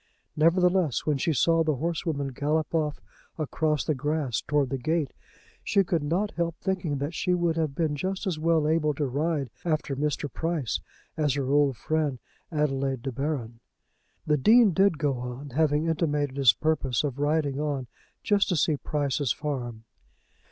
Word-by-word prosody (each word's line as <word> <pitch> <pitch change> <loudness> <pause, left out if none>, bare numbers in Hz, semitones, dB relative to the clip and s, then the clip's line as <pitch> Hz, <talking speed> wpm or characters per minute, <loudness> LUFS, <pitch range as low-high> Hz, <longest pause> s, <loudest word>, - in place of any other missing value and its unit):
Nevertheless, 175 - +3
when 150 -3 +1
she 165 - +1
saw 165 +3 +3
the 155 -2 +1
horsewoman 155 -1 -2
gallop 150 +5 -1
off 155 -3 0 0.4
across 155 -1 0
the 155 - 0
grass 145 -2 -1
towards 145 -3 0
the 135 - -1
gate, 155 0 -1 0.5
she 200 -1 +3
could 170 -3 0
not 175 +8 0
help 170 0 -2
thinking 180 -6 -1
that 140 +4 -3
she 180 +2 +1
would 170 -2 +1
have 155 -4 -1
been 155 -2 0
just 190 +7 -3
as 175 -5 -2
well 160 -1 +2
able 155 -2 +1
to 145 - -1
ride 140 -1 -1
after 155 -4 -1
Mr. 150 +1 -1
Price 160 -8 -1 0.4
as 150 -3 +1
her 135 -2 -1
old 140 -3 +3
friend 155 -4 -1 0.3
Adelaide 135 -4 -1
de 135 - -2
Baron. 125 -4 -3 0.7
The 150 -1 +2
Dean 220 - +6
did 190 -1 +3
go 140 -5 0
on, 125 +3 -6
having 150 +2 +2
intimated 150 -4 0
his 135 -5 +6
purpose 140 -5 0
of 140 -2 -3
riding 145 -1 +1
on 145 -3 -2 0.4
just 205 -2 +2
to 180 - +2
see 155 -1 +2
Price's 145 -2 -1
farm. 125 -7 -4
150 Hz, 165 wpm, -27 LUFS, 140-165 Hz, 0.7 s, Dean